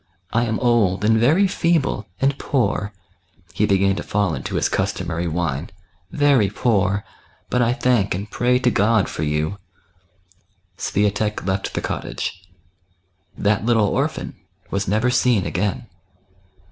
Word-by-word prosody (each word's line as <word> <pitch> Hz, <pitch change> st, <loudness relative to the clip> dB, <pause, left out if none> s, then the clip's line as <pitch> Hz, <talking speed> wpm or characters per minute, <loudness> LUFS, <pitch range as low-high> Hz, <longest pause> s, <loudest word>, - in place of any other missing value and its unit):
I 120 Hz, +1 st, +2 dB
am 110 Hz, -1 st, -1 dB
old 105 Hz, -6 st, +2 dB
and 110 Hz, +1 st, +4 dB
very 155 Hz, -, +4 dB
feeble, 165 Hz, -, 0 dB
and 135 Hz, +1 st, +2 dB
poor 120 Hz, -6 st, 0 dB, 0.2 s
'* 90 Hz, -2 st, -42 dB
— 85 Hz, +1 st, -29 dB
he 105 Hz, -, +1 dB
began 95 Hz, -1 st, +3 dB
to -, -, -2 dB
fall 100 Hz, -5 st, 0 dB
into 65 Hz, -3 st, -4 dB
his -, -, +2 dB
customary 85 Hz, +2 st, -2 dB
whine 80 Hz, -2 st, -2 dB
— 85 Hz, -, -38 dB
" 95 Hz, -, -38 dB
very 130 Hz, -9 st, +4 dB
poor, 100 Hz, -2 st, 0 dB, 0.5 s
but 125 Hz, -, +2 dB
I 120 Hz, 0 st, +3 dB
thank 125 Hz, -8 st, +1 dB
and 100 Hz, +3 st, -5 dB
pray 125 Hz, +3 st, +1 dB
to 125 Hz, -1 st, +2 dB
God 110 Hz, 0 st, +2 dB
for -, -, -5 dB
you." 75 Hz, +6 st, -1 dB, 1.2 s
Swiatek 105 Hz, +2 st, -1 dB
left 95 Hz, +1 st, -2 dB
the -, -, -1 dB
cottage. 90 Hz, -1 st, -5 dB, 0.9 s
That 105 Hz, 0 st, +1 dB
little 110 Hz, -3 st, +3 dB
orphan -, -, -2 dB, 0.4 s
teas 100 Hz, 0 st, -1 dB
never 110 Hz, +6 st, +2 dB
seen 125 Hz, -5 st, +2 dB
a^gain. 105 Hz, +8 st, -2 dB
105 Hz, 150 wpm, -21 LUFS, 95-120 Hz, 1.2 s, and